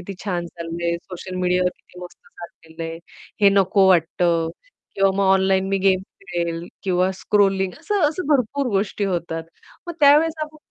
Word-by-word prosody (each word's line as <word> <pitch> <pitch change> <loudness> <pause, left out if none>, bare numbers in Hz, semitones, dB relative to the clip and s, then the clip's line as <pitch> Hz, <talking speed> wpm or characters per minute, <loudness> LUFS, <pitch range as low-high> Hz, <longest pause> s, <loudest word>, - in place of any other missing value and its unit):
किती 190 +2 -8
छान 175 -4 -2
चाललंय 170 0 -4
सोशल 185 0 -8
मीडियावर 180 0 +2
किती 180 - -16
मस्त 180 0 -10
चाललेलं 165 -1 -12
आहे. 165 - -7 0.4
हे 200 - +7
नको 195 0 +3
वाटतं 170 -1 +2 0.5
किंवा 195 0 +3
मग 200 - +2
ऑनलाईन 190 0 +2
मी 195 0 0
गेम 190 -1 +3 0.3
खेळेल 170 -2 -3 0.2
किंवा 185 0 +1
स्क्रॉलिंग 195 -1 +1
असं, 415 -1 -1
असं 315 +2 -5
भरपूर 275 0 +1
गोष्टी 200 +1 -1
होतात. 170 -3 -2 0.4
मग 345 - -4
त्यावेळेस 300 +3 +5
आपण 305 0 -7
190 Hz, 155 wpm, -22 LUFS, 175-200 Hz, 0.5 s, हे